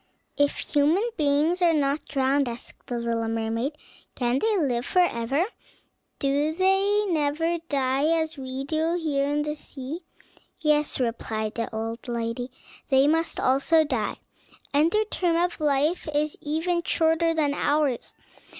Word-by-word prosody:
"If 285 0 +1 0.2
human 315 +10 +3
beings 305 +3 +2
are 335 -2 +4
not 285 0 0
drowned," 270 -1 +1
asked 235 0 -10
the 245 - -3
little 230 -1 -1
mermaid, 225 +5 -1 0.4
"can 245 +1 +1
they 435 +2 +2
live 250 -8 0
forever? 285 -3 +1 0.7
do 285 +3 0
they 390 +3 +3
never 325 +1 0
die 270 0 +1
as 320 0 -2
we 265 -1 -5
do 315 +4 0
here 285 -4 0
in 295 +1 0
the 300 0 -2
sea?" 290 +2 -7 0.6
"Yes," 300 -2 +1
replied 225 -3 -2
the 230 - -3
old 225 +2 -5
lady, 235 +1 -3 0.4
"they 270 0 +5
must 325 +2 +1
also 280 +5 +3
die, 255 -8 -2 0.6
and 300 +3 +4
their 430 +4 +1
term 355 -5 0
of 350 +1 0
life 300 +4 +1
is 300 +1 0
even 325 +4 0
shorter 330 0 +2
than 295 -3 +2
ours. 290 -4 0
290 Hz, 140 wpm, -25 LUFS, 260-325 Hz, 0.7 s, they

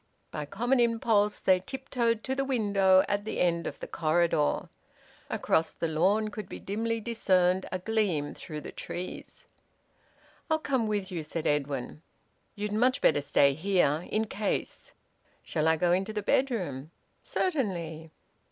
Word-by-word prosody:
By - - -4
a - - -4
common 240 - +1
impulse 225 -3 +2
they 185 -1 +4
tiptoed 235 +1 -2
to 265 - -1
the 275 +1 0
window 200 -7 +3
at 205 0 0
the 220 - -4
end 170 -1 +1
of - - -6
the - - -6
corridor. 160 -2 +1 0.6
Across 160 0 +1
the 165 - -2
lawn 195 +7 +2
could 215 0 -7
be - - -7
dimly 225 +3 -2
discerned 190 -5 +2
a 185 - -1
gleam 185 -7 0
through 155 -3 -7
the - - -8
trees. 180 +1 -7 1.0
"I'll 315 - +3
come 260 -7 0
with 205 -2 -2
you," 170 -3 -3
said 155 +1 -5
Edwin. 145 -1 -1 0.5
"You'd 210 0 -3
much 250 +5 +2
better 145 -2 +3
stay 140 0 +4
here 165 -1 +1
in 220 +1 0
case." 210 -1 -3 0.5
"Shall 155 0 0
I 160 - +5
go 175 +2 +2
into 190 +4 +1
the 210 -1 -3
bedroom?" 180 - 0 0.3
"Certainly." 175 - -2
195 Hz, 150 wpm, -29 LUFS, 160-225 Hz, 1.0 s, I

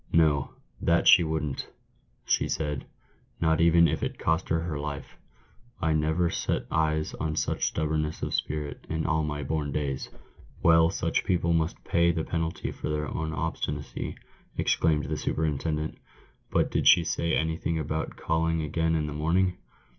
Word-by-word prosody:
'No, 75 -4 +3 0.3
that 85 0 +3
she 90 - +8
wouldn't,' 80 -3 -2 0.6
she - - +1
said, 75 -3 -2 0.2
' - - -37
not 80 -1 +2
even 85 0 +6
if - - -1
it - - -3
cost 80 +3 0
her 80 0 +1
her 80 -4 -3
life 70 -1 -6 0.3
!' 120 0 -32
I 80 -1 +1
never 80 +3 +1
set - - -1
eyes 80 0 +1
on 75 0 -1
such - - 0
stubbornness 75 0 -1
of - - -2
spirit 75 -1 -3
in 80 0 -1
all 80 -1 +2
my 75 -1 -3
born 75 0 -2
days." 70 -2 -2 0.3
" - - -23
Well, 80 -1 +6
such 85 -3 0
people 85 -2 +1
must 80 0 -1
pay 85 0 +3
the 80 -1 -2
penalty 80 0 -2
of - - -10
their 75 -1 -1
own 80 -1 -3
obstinacy," 75 - -3 0.4
exclaimed 75 -2 +2
the 75 +1 -2
superintendent. 75 0 -2 0.5
"But - - +1
did - - +1
she 85 - +8
say 85 0 0
anything 80 +1 -1
about 80 0 -3
calling 80 0 0
again 80 +2 0
in 75 -1 0
the 75 - -4
morning 90 +5 +1
80 Hz, 170 wpm, -27 LUFS, 75-80 Hz, 0.6 s, she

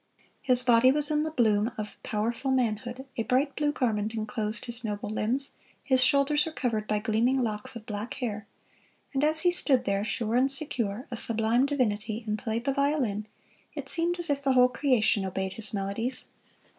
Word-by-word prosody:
His 250 -2 +3
body 245 +1 +6
was 295 +2 +1
in 300 0 +2
the 315 - -1
bloom 225 -5 +2
of 210 -1 -5
powerful 230 +5 -2
manhood, 245 0 -1
a - - +1
bright 265 +5 +1
blue 295 -1 +1
garment 220 -5 -1
enclosed 215 0 -2
his 235 0 -7
noble 210 -1 -3
limbs, 250 +6 -1 0.3
his 260 -2 +3
shoulders 285 +2 +3
were - - -4
covered 230 -8 -2
by 210 - +1
gleaming 230 +5 +1
locks 210 -1 -3
of 225 -2 -8
black 210 +2 -5
hair; 215 -5 -4 0.7
and 270 +1 0
as 310 +1 +2
he 355 - +4
stood 275 -7 +2
there, 200 0 0
sure 220 +1 -2
and 260 +2 +4
secure, 250 -6 -3
a - - -2
sublime 230 +3 +1
divinity, 220 -5 -1
and 215 0 -2
played 230 +1 -3
the 275 - +1
violin, 265 -8 0 0.5
it - - -2
seemed 345 +1 0
as 345 -4 -2
if 280 -1 0
the 275 -1 +2
whole 250 0 +6
creation 245 -6 +2
obeyed 190 0 -3
his 220 -2 -5
melodies. 210 +5 -2
240 Hz, 185 wpm, -28 LUFS, 215-270 Hz, 0.7 s, body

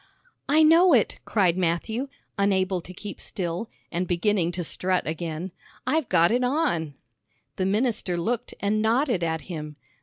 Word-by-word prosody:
'" - - -36
"I 310 +2 +5
know 330 +3 +6
it," 230 -6 +2
cried 185 -4 +2
Matthew, 185 +9 -1 0.3
unable 190 -2 +1
to 180 - -10
keep 200 +2 -8
still, 180 +4 -4 0.2
and 175 +2 -1
beginning 175 0 +1
to 175 0 -3
strut 185 +3 -1
again. 165 +2 -4 0.3
"I've 315 -5 0
got 170 0 +4
it 245 +2 +2
on." 250 - 0 0.6
The 185 - 0
minister 210 -4 0
looked 235 +8 -2
and 210 +1 +1
nodded 230 - +2
at 160 -1 -1
him. 150 -2 -7
190 Hz, 155 wpm, -25 LUFS, 170-235 Hz, 0.6 s, know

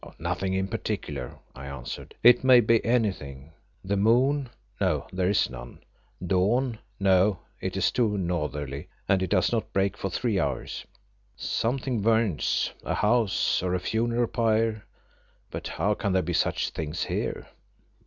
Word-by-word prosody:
"Nothing 90 +3 -2
in 95 0 0
particular," 60 -8 -4 0.2
I 70 +1 -8
answered, 70 -3 -7
"it 120 +1 +7
may 130 -1 +8
be 115 -1 +3
anything. 85 - -1 0.3
The 100 +1 0
moon 125 +6 +3 0.3
no, - - +1
there 90 0 +1
is 100 - +3
none, - - -10 0.4
dawn 110 +7 +1 0.2
no, 95 0 +4 0.2
it - - -3
is - - +2
too 110 -4 +1
northerly, 75 -4 -3 0.2
and 95 -2 +3
it 95 - -1
does 95 -3 +2
not 115 -2 -1
break 95 0 +1
for 95 - -3
three 105 +1 0
hours. - - -3 0.5
Something 125 0 -1
burning, 110 - +2 0.4
a - - -1
house, 110 -1 +2
or 90 0 0
a - - 0
funeral 115 +5 0
pyre, 110 -2 0 0.6
but - - -5
how 105 +2 0
can 100 -2 -1
there 95 - +2
be 90 +2 -2
such - - 0
things 75 -1 -3
here? - - -3
100 Hz, 150 wpm, -27 LUFS, 90-115 Hz, 0.6 s, may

